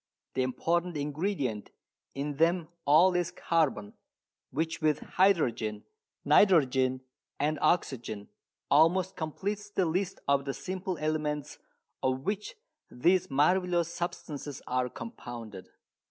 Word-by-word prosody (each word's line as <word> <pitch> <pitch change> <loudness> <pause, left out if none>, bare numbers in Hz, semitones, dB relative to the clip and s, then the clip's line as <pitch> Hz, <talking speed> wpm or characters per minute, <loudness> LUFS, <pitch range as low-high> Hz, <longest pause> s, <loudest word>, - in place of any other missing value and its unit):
The 130 - 0
important 170 +6 0
ingredient 145 - -2 0.5
in 140 +1 -3
them 165 +1 +2 0.2
all 165 +6 +6
is 175 -1 0
carbon, 160 - 0 0.6
which 160 +5 -2
with 155 -2 +2
hydrogen, 120 - +1 0.4
nitrogen 135 -6 +4 0.4
and 150 0 0
oxygen 120 - 0 0.4
almost 180 +5 +4
completes 200 +6 -4
the 190 -2 +1
list 180 +3 -1
of 140 0 +2
the 135 - -3
simple 185 -1 -4
elements 150 -1 -2 0.4
of 130 0 0
which 205 +5 -3 0.3
these 180 +8 +2
marvellous 170 +4 +2
substances 150 -5 -5
are 125 0 0
compounded. 115 -4 -8
155 Hz, 110 wpm, -30 LUFS, 130-180 Hz, 0.6 s, all